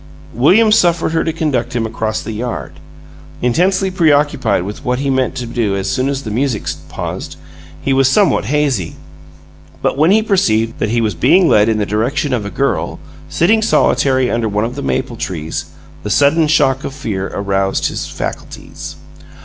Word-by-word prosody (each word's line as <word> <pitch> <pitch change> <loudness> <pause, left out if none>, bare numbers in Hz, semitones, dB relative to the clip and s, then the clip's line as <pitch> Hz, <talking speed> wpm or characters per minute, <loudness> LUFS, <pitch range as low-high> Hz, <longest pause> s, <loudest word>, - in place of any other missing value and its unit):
William 195 - +4
suffered 175 -7 +3
her 165 - +1
to 165 - -1
conduct 135 -7 -2
him 115 -2 0
across 110 -1 -2
the - - -5
yard. 115 +2 -4 0.7
Intensely 185 +9 +2
preoccupied 145 - +2
with 105 +7 -7
what 125 -2 0
he 135 +1 -1
meant 130 -1 0
to 125 - -4
do 115 -4 -1
as 95 -1 -2
soon 130 +2 0
as 140 0 -3
the 110 - -5
music 120 -1 -1 0.3
paused, - - -5 0.5
he 135 - +1
was 135 -1 +4
somewhat 200 - +2
hazy, 130 - 0 0.9
but - - 0
when 155 +3 +4
he 215 +3 +4
perceived 115 - +1
that 105 - 0
he 115 +1 +1
was 110 -3 0
being 175 - +4
led 105 -4 +4
in 110 - +1
the 105 - 0
direction 125 - -1
of 110 -5 -1
a - - -4
girl, 140 +6 -1 0.3
sitting 195 - +2
solitary 130 - +2
under 115 -1 0
one 105 +2 0
of 120 - -4
the 140 - -6
maple 130 -3 -2
trees, 80 -6 -4 0.4
the 105 - -5
sudden 145 +7 +3
shock 135 -3 +2
of 135 - -6
fear 105 -9 -3
aroused 95 -1 -1
his - - -2
faculties. - - -7
130 Hz, 180 wpm, -16 LUFS, 110-150 Hz, 0.9 s, William